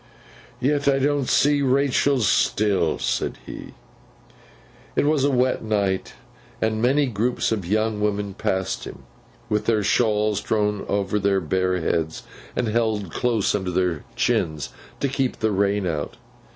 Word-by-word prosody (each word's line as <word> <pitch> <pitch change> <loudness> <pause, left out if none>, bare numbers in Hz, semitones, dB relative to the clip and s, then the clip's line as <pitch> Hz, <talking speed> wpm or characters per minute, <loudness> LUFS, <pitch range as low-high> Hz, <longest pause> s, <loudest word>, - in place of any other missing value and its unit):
'Yet 140 +2 +1
I 140 -1 +4
don't 140 -1 +1
see 145 0 +3
Rachael, 140 0 +2
still!' 100 -4 +2
said - - -1
he. - - -9 1.2
It - - +2
was 150 -2 +2
a 140 - +3
wet 130 -1 +1
night, 100 -3 -1 0.5
and 110 0 0
many 140 +4 +3
groups 120 0 -1
of 100 -6 -2
young 110 +2 0
women 105 -1 -1
passed 95 0 -2
him, - - -10 0.4
with 105 -2 -1
their 110 -3 +2
shawls 105 -1 +2
drawn 105 -2 0
over 100 +1 0
their 100 -1 +2
bare 90 +2 0
heads 80 -1 -1 0.3
and 125 - 0
held 110 -4 0
close 115 -1 +1
under 95 -3 -1
their 90 -3 0
chins 80 -2 0 0.3
to 140 - +2
keep 135 -1 -1
the 110 -1 0
rain 100 0 +1
out. 75 -4 -3
105 Hz, 145 wpm, -23 LUFS, 95-125 Hz, 1.2 s, I